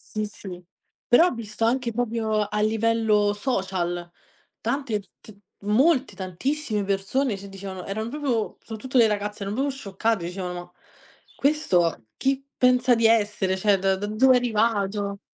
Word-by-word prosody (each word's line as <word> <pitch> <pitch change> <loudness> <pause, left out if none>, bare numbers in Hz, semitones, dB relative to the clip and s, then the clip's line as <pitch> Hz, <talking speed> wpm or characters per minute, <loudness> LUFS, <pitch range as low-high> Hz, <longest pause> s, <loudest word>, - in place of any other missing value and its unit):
Sì, 215 0 0
sì, 190 -3 -9 0.5
però 325 +9 +6
ho - - -1
visto 225 -2 -5
anche 235 0 +1
proprio 220 -2 0
a 210 +1 -3
livello 220 -1 +2
social, 185 -6 -2 0.5
tante 265 -7 -1 0.2
t 215 - -13 0.3
molte, 260 +7 +3
tantissime 210 - -2
persone 200 +4 0
cioè 200 - -10
dicevano 195 -2 -8
erano 220 +3 -3
proprio 260 -5 -2
soprattutto 245 +4 -4
le 230 -2 +7
ragazze 205 0 -3
erano 200 +1 -3
proprio 275 +3 0
scioccate, 220 -5 -2
dicevano: 180 0 -4
"Ma 175 0 -8 0.7
questo 180 - +1
chi 270 0 0
pensa 250 0 +4
di 230 -1 +2
essere, 210 -4 +2
cioè 195 +1 +2
da 190 0 +2
da 195 +2 -4
dove 245 +5 +4
è - - +5
arrivato?" 210 -4 0
215 Hz, 150 wpm, -25 LUFS, 195-245 Hz, 0.7 s, le